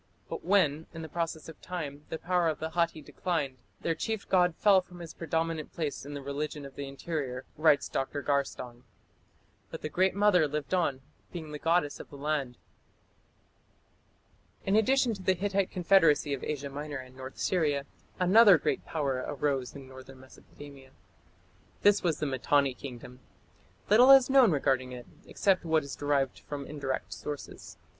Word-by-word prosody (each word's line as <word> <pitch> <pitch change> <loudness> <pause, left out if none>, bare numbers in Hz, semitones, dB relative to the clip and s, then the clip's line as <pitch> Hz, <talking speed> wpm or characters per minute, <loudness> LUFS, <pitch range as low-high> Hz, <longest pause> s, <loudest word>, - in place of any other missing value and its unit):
But - - -5
when, 160 -5 +2
in 165 - -6
the - - -6
process 165 0 -4
of 160 - -12
time, 150 -5 -6
the - - -3
power 175 0 +1
of 155 - 0
the 160 +1 -5
Hatti 170 -2 0
declined, 145 -6 -3 0.2
their 165 - 0
chief 220 +5 -4
god 180 -3 +3
"fell... 195 -1 +5
from 180 -1 -15
his 165 -2 -8
predominant 165 -1 -2
place 150 -4 -4
in 145 - -6
the 140 - -6
religion 145 +1 -4
of 135 - -10
the 140 - -5
interior", 135 -2 -4
writes 155 -2 +3
Dr. 140 +2 -3
Garstang. 130 -4 -2 0.9
"But - - -8
the 155 - -2
Great 185 +3 +1
Mother 200 -6 +4
lived 150 +3 -4
on, 145 -8 +1 0.3
being 160 -3 -7
the 150 - -6
goddess 165 -2 +1
of - - -10
the - - -12
land." 140 -3 -2 2.1
In 195 - +2
addition 245 +2 +3
to 195 - -8
the 185 0 +2
Hittite 195 +1 0
confederacy 165 -5 +3
of 135 - -4
Asia 145 -2 -3
Minor 145 +1 -5
and 130 -1 -11
North 130 0 -9
Syria, 150 -6 0 0.3
another 195 +1 +7
great - - -1
power 135 -5 -2
arose 140 -3 -2
in 135 -2 -10
northern 130 0 -12
Mesopotamia. 135 +1 -14 0.9
This 205 0 +5
was 165 -4 0
the 150 - -2
Mitanni 140 0 +1
Kingdom. 125 -1 -10 0.7
Little 240 +6 +6
is 270 -1 +8
known 265 -4 +7
regarding 130 -3 0
it, 125 -1 -8 0.2
except 195 -2 +1
what 160 -2 +2
is 140 - -7
derived 140 -2 0
from 145 -1 -7
indirect 140 -3 -4
sources. 145 -1 -8
150 Hz, 165 wpm, -29 LUFS, 140-180 Hz, 2.1 s, is